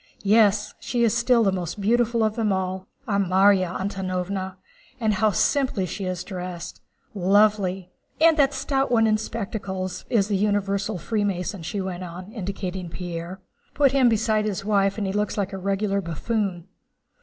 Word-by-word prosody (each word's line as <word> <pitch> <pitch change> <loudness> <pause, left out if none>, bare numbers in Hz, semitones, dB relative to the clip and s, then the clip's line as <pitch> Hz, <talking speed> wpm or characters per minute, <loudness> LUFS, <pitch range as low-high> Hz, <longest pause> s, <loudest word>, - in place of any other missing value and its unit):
Yes, 210 0 +3
she 240 -1 -1
is 230 -1 +3
still 235 -1 +3
the 195 - +3
most 185 +1 -4
beautiful 230 +2 +2
of 215 0 +1
them 220 -3 +1
all, 190 0 -2 0.2
our 200 -2 +1
Márya 190 -1 +3
Antónovna! 190 0 -3 0.4
And 220 -2 +1
how 215 +2 +3
simply 240 - +1
she 190 +2 -5
is 185 -1 -3
dressed! 180 -3 -7 0.3
Lovely! 195 -1 +2 0.3
And 325 0 +6
that 285 -3 +3
stout 270 -1 0
one 230 -2 +4
in 215 -1 +2
spectacles 195 -4 -4
is 210 -5 +2
the 210 - 0
universal 200 0 0
Freemason," 200 -1 -2
she 175 +5 -4
went 185 -1 -4
on, 180 +3 -8
indicating 190 -4 -5
Pierre. 175 +2 -6 0.3
"Put 280 -2 +4
him 265 -3 +4
beside 220 -1 +1
his 200 -1 -3
wife 200 -1 +2
and 210 - -1
he 190 - -2
looks 210 +1 -1
a 200 - +1
regular 195 +1 -1
buffoon!" 180 +1 -2
200 Hz, 160 wpm, -24 LUFS, 185-215 Hz, 0.4 s, And